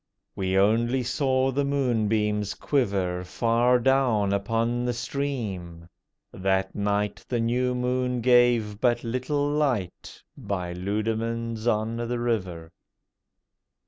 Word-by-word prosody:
We 95 0 0
only 115 +6 +2
saw 130 +1 +1
the 140 +2 0
moonbeams 110 -7 0
quiver 95 -10 0
Far 115 +6 +2
down 120 -6 +2
upon 115 +4 0
the 125 0 0
stream! 110 -10 -4 0.5
that 95 0 0
night 105 0 -1
The 120 - 0
new 125 +2 0
moon 125 0 -1
gave 120 -4 +3
but 120 -1 +2
little 130 +5 -1
light 135 - -2
By 100 -8 -4
Leudemanns 110 +4 -2
on 110 0 0
the 120 +1 -2
River. 95 -9 -2
115 Hz, 110 wpm, -26 LUFS, 100-125 Hz, 0.5 s, gave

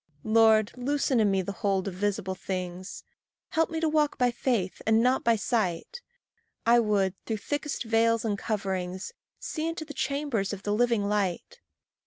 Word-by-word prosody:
Lord, 220 -1 +4
loosen 265 0 0
in 215 -2 +4
me 190 -1 +1
the 200 - -4
hold 195 -2 -1
of 195 - -3
visible 190 0 -1
things; 185 -1 -5 0.5
Help 325 -2 +1
me 325 - -3
to 325 - +1
walk 305 -1 +1
by 250 -1 +3
faith 235 -7 -1
and 220 +1 +4
not 255 +1 +2
by 230 -1 +4
sight; 220 - -1 0.6
I 235 +1 +6
would, 205 -4 +1
through 220 - -1
thickest 290 +7 -3
veils 230 0 +2
and 210 -2 0
coverings, 190 - -3 0.2
See 315 0 -4
into 330 -1 -4
the 295 - -8
chambers 265 -7 -1
of 200 0 -7
the 205 - 0
living 230 -2 +2
light. 200 -4 -2
220 Hz, 170 wpm, -28 LUFS, 195-255 Hz, 0.6 s, I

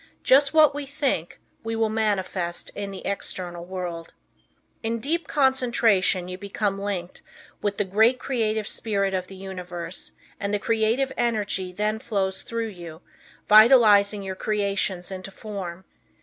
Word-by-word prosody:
Just 275 +1 +5
what 310 -2 +6
we 290 -1 -5
think, 275 - -2 0.2
we 225 0 -3
will 225 0 +2
manifest 195 -5 -1
in 200 -1 -5
the 195 - -8
external 180 -3 -3
world. 175 -2 -6 0.7
In 230 0 -1
deep 305 +7 -1
concentration 235 -9 +2
you 185 0 -7
become 200 0 -2
linked 195 -3 -4 0.4
with 205 -1 -1
the 205 - +1
great 220 +6 +4
creative 220 -5 -1
spirit 200 -3 0
of 185 -1 -2
the 195 - -11
universe, 180 -2 -6 0.3
and 200 - -2
the 205 - +2
creative 230 +5 +1
energy 205 -5 -1
then 210 +3 -1
flows 195 -4 -2
through 230 -1 -3
you, 170 -4 -10 0.5
vitalizing 215 -3 +6
your 190 -1 -4
creations 200 -3 -1
into 190 0 -6
form. 190 -3 -7
205 Hz, 140 wpm, -25 LUFS, 185-225 Hz, 0.7 s, what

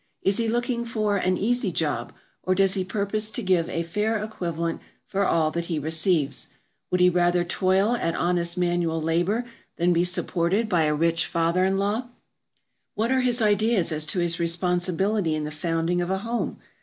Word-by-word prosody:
Is 195 0 +2
he 230 - 0
looking 240 +1 -1
for 215 -3 0
an 185 -1 +1
"easy 235 -2 0
job," 145 -8 -2 0.3
or 185 - 0
does 195 0 +3
he 190 -2 0
purpose 210 +3 -2
to 220 - -2
give 180 -3 +2
a 165 - -2
fair 210 +7 -1
equivalent 170 -6 -3 0.2
for 200 0 -1
all 160 -4 +2
that 170 +1 -3
he 170 -2 -2
receives? 155 -2 0 0.4
Would 180 - +1
he 180 - +7
rather 175 0 +2
toil 190 +5 +2
at 165 -8 -1
honest 175 0 0
manual 175 -2 0
labor 175 +9 0 0.3
than 175 +1 +3
be 170 0 +2
supported 180 +4 0
by 175 -6 +2
a 150 0 +1
rich 165 +1 +2
father 170 +2 +1
in 190 0 +1
law? 210 +5 -1 0.9
What 225 +4 0
are 260 -1 +3
his 245 -2 +1
ideas 210 -3 +2
as 155 0 0
to 185 - -2
his 175 -1 0
responsibility 175 +2 0
in 155 - -2
the 150 - -4
founding 165 +2 -1
of 175 - -2
a 190 - +1
home? 230 +4 -3
180 Hz, 185 wpm, -25 LUFS, 170-205 Hz, 0.9 s, he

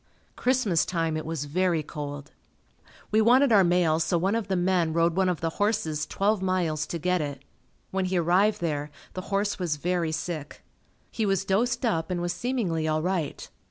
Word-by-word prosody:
Christmas 245 -10 +2
time 165 -3 -1
it 155 0 -4
was 160 -3 -3
very 170 +1 +1
cold. 145 -1 -7 0.8
We 215 +1 +4
wanted 250 +4 +5
our 200 -3 +6
mail 175 -3 +3
so 170 +2 +1
one 190 +4 +1
of 225 -3 -1
the 190 - 0
men 175 -2 +1
rode 170 0 +2
one 190 -1 +2
of 180 - -2
the 165 0 -1
horses 185 -8 0
twelve 205 0 +1
miles 175 -5 0
to 170 - -3
get 180 +1 0
it. 140 -2 -5 0.5
When 190 0 0
he 185 0 0
arrived 190 +5 +2
there 150 -3 -2 0.2
the 185 - -4
horse 200 +1 0
was 170 -4 -1
very 170 +1 -1
sick. 155 -2 -5 0.5
He 225 - -2
was 195 -2 +1
dosed 235 +7 +1
up 165 -8 0
and 180 -1 -1
was 175 0 -1
seemingly 195 -11 -1
all 155 0 0
right. 180 -4 -2
175 Hz, 190 wpm, -26 LUFS, 160-195 Hz, 0.8 s, our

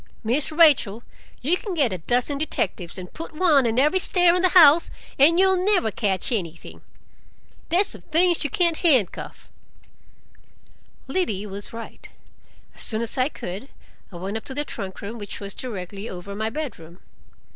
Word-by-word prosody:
Miss 255 +8 +1
Rachel, 280 -9 +4 0.4
you 315 +7 +3
can 380 0 -6
get 275 - +2
a 185 - -5
dozen 250 - 0
detectives 185 - -2
and 180 -1 -9
put 325 -1 -9
one 305 -7 +4
on 225 +1 -1
every 300 +8 +3
stair 355 -1 +4
in 360 - +1
the 370 - +3
house, 330 -3 +6 0.3
and 320 +5 +6
you'll 380 -1 +3
never 375 - +2
catch 200 +2 -1
anything. 170 -7 -5 0.9
There's 365 +4 +4
some - - -2
things 340 +2 +1
you 295 - -1
can't 340 +3 +1
handcuff." 260 - 0 1.6
Liddy 265 - -2
was 200 0 -7
right. 230 0 -10 0.6
As - - -5
soon 220 0 -2
as 230 - -4
I 255 +2 +1
could, 205 - -8 0.4
I - - -12
went 190 +5 -4
up 220 - -9
to 265 - -6
the 295 +1 -2
trunk 190 -7 -7
room, 225 +3 -6
which 205 -1 -6
was 200 -1 -6
directly 200 -3 -7
over 185 +2 -8
my 220 +2 -2
bedroom. 210 - -7
255 Hz, 165 wpm, -23 LUFS, 200-330 Hz, 1.6 s, house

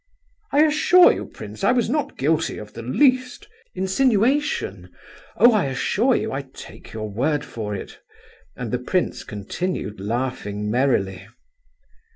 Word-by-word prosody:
"I 290 +2 +5
assure 315 +4 +6
you, - - -6
prince, - - -10
I 255 - +4
was 245 -2 +1
not 295 +5 -2
guilty 155 +4 0
of 105 -1 -10
the - - -7
least—" 255 - +1 0.3
"Insinuation? 255 +8 +1 0.5
Oh! 240 - +7
I 210 -7 +2
assure 195 - +1
you, - - -2
I 135 - -2
take 135 -1 -13
your 110 -1 -5
word 140 +8 -1
for 105 -3 -5
it." 95 - -8 0.6
And 120 -3 -5
the 125 - 0
prince 180 +8 -1
continued 105 - -4
laughing 105 -2 -3
merrily. 100 -7 0
140 Hz, 140 wpm, -22 LUFS, -, 0.6 s, Oh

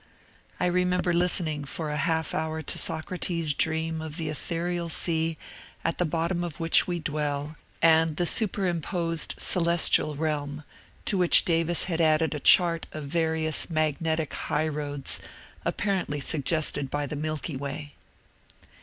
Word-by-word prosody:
I - - +1
remember 180 0 +1
listening 170 -4 +1
for 150 +3 -5
a - - -3
half 160 0 -1
hour 160 0 -3
to - - -1
Socrates' 165 -1 -1
dream 160 +1 0
of 160 0 -7
the 160 -3 -2
ethereal 170 +2 -3
sea 165 -1 0 0.5
at 165 - -1
the 180 - +2
bottom 170 +2 -1
of 170 -4 -6
which 165 0 +5
we 175 -1 -2
dwell, 150 -1 -3 0.3
and 160 -1 +4
the 175 - +1
superimposed 175 -5 0
celestial 170 -3 +3
realm, 150 -1 -3 0.4
to 195 - +1
which 180 -1 +6
Davis 165 0 +2
had 170 -2 -1
added 155 0 +3
a 150 - -4
chart 170 +2 +5
of 155 - -7
various 160 +1 0
magnetic 160 0 -1
higl^roads 145 -2 -2 0.5
apparently 190 -7 -2
suggested 150 -1 0
by 145 +1 -2
the 145 - -5
Milky 155 0 -4
Way. 140 +2 -6
160 Hz, 135 wpm, -26 LUFS, 150-170 Hz, 0.5 s, which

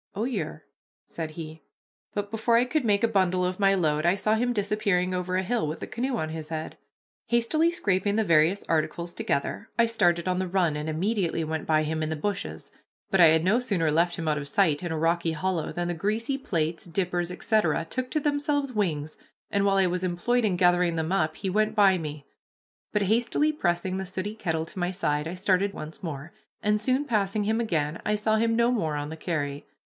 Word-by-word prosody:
"Oh, 210 - -1
yer," 250 +1 -3 0.4
said 160 -2 -6
he; 155 0 -8 0.5
but 205 0 -3
before 225 +1 +2
I 245 - +4
could 295 +3 0
make 205 -2 +2
a - - +5
bundle 185 -4 +2
of 185 +1 -2
my 195 -1 +4
load 155 -4 +1
I 175 +2 +4
saw 215 +2 +1
him 245 +3 +1
disappearing 200 -4 0
over 180 0 -1
a 190 - 0
hill 225 -3 0
with 155 - -4
the - - -6
canoe 250 +1 -2
on 155 -6 -2
his 155 -1 -6
head. 160 -1 -5 0.5
Hastily 240 +8 +2
scraping 200 - 0
the 220 - +3
various 170 +2 +3
articles 170 +2 -1
together, 140 +9 -2
I 235 - +6
started 175 -6 +1
on 180 0 +1
the 185 - -1
run, 175 -4 +1
and 150 +1 -3
immediately 175 0 0
went 160 0 -3
by 155 -1 +3
him 155 +1 -2
in 155 - -2
the 160 - -1
bushes, 200 +5 -4 0.4
but 195 - +3
I 170 - +9
had 160 0 +4
no 205 +7 +3
sooner 190 -11 0
left 170 +3 +2
him 165 - -4
out 150 -1 +1
of 140 - -6
sight 155 0 +2
in 175 - -3
a 160 - -1
rocky 165 +1 +1
hollow 165 0 -2
than 175 0 -2
the 175 - -1
greasy 215 - -1
plates, 165 - -2
dippers, 175 0 -1
etc., 180 -4 +1
took 255 0 -3
to 310 - +1
themselves 290 -2 0
wings, 155 -8 -2 0.3
and 200 -1 +2
while 195 -1 +3
I 190 -1 +4
was 180 +1 -2
employed 185 +8 +1
in 190 -4 +1
gathering 175 -1 +3
them 160 +1 -2
up, 155 -5 0
he 190 - -3
went 215 +3 +1
by 195 -3 +5
me; 150 -3 -6 0.7
but, 210 -1 +1
hastily 235 +9 +2
pressing 185 - -1
the 190 - -3
sooty 190 +3 -4
kettle 160 -6 -2
to 175 - -9
my 175 0 0
side, 150 -5 -1
I 170 - -5
started 195 +1 +1
once 155 +1 -8
more, 155 0 -6 0.3
and, 210 0 +1
soon 260 +5 +1
passing 210 -4 0
him 220 +2 +1
again, 160 -8 -1
I 210 - +1
saw 215 +1 +1
him 230 +1 +2
no 235 +1 +3
more 160 -11 0
on 145 0 -3
the 160 - -7
carry. 145 -4 -3
185 Hz, 220 wpm, -27 LUFS, 160-215 Hz, 0.7 s, I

